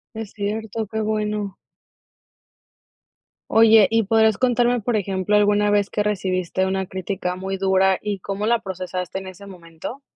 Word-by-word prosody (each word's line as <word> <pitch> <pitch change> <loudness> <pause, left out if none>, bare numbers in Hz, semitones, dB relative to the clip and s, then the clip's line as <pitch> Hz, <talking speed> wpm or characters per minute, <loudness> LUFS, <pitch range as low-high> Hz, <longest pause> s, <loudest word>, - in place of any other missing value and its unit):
Es 220 -2 -6
cierto, 215 +1 -3
qué 220 0 -2
bueno. 210 -2 -2 2.0
Oye, 225 -2 +6
¿y 225 0 +2
podrías 220 0 +3
contarme, 245 -1 +2
por 230 +2 -1
ejemplo, 195 0 0
alguna 205 0 +3
vez 205 -1 +2
que 210 - -1
recibiste 190 -2 -1
una 190 0 -1
crítica 185 -1 -4
muy 190 +1 -4
dura, 190 0 +3
y 205 -2 -4
cómo 195 +3 -4
la 235 +1 +2
procesaste 185 -2 -5
en 190 - -6
ese 190 +2 -11
momento? 175 - -9
205 Hz, 150 wpm, -22 LUFS, 190-220 Hz, 2.0 s, Oye